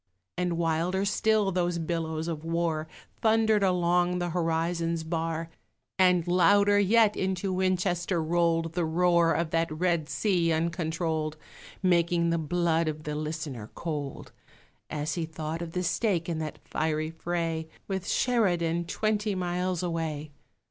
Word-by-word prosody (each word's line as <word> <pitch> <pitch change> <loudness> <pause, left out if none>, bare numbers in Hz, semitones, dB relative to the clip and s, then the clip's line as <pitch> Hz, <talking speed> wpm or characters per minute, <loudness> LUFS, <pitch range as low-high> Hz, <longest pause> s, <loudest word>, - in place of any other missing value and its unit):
And 175 -1 -1
wilder 170 +4 0
still 210 -1 +2
those 175 -1 0
billows 160 -1 -2
of 160 -2 -4
war 165 -1 -1 0.3
Thundered 220 -1 +3
along 180 -1 +2
the 175 -1 -2
horizon's 165 0 0
bar; 165 0 -3 0.5
And 180 -2 +4
louder 200 +3 +5
yet 210 +1 +4
into 190 0 -1
Winchester 180 -1 0
rolled 165 0 +1
The 175 0 0
roar 170 +1 +3
of 165 -1 -1
that 165 -1 +1
red 170 -1 0
sea 180 -6 +1
uncontrolled, 160 -1 -1 0.5
Making 170 -1 +3
the 170 - +1
blood 165 +1 +1
of 155 0 -3
the 150 - -4
listener 150 -7 -4
cold 150 -5 -5 0.6
As 150 +1 -2
he 170 -2 -2
thought 160 +1 -5
of 165 -1 -6
the 180 - -1
stake 175 0 0
in 165 -2 -2
that 155 -1 -4
fiery 155 0 -1
fray, 165 -1 -2 0.2
With 190 -2 -3
Sheridan 175 -8 +1
twenty 210 +2 -1
miles 180 0 -1
away! 160 -3 -3
170 Hz, 135 wpm, -28 LUFS, 160-180 Hz, 0.6 s, louder